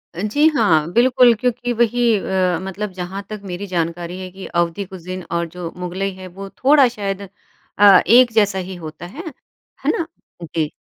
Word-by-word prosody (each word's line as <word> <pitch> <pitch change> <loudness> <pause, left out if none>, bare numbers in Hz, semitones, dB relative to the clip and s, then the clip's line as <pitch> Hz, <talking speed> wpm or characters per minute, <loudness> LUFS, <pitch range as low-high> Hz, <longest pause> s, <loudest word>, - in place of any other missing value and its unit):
अ, 175 - -4
जी 290 +9 +3
हाँ। 165 - +3
बिल्कुल 250 0 +5
क्योंकि 245 0 -1
वही 235 0 +2
अ, 185 -3 0
मतलब 195 +2 -5
जहाँ 185 +2 -6
तक 215 -1 -6
मेरी 185 +2 -5
जानकारी 175 0 -3
है 185 -1 -6
कि 190 +1 -10
अवधी 175 +3 -1
कुज़ीन 185 -1 -8
और 170 0 0
जो 175 0 -7
मुग़लई 185 +2 -3
है 185 0 -10
वो 195 +2 -9
थोड़ा 275 -1 +6
शायद 200 -4 -4 0.6
अ, 200 -2 +8
एक 240 +2 +6
जैसा 205 -3 +2
ही 185 +1 -6
होता 160 0 -9
है। 275 - -9 0.6
है - - +4
ना? 335 - -2 0.4
जी। 160 -2 -2
190 Hz, 175 wpm, -20 LUFS, 180-225 Hz, 0.6 s, अ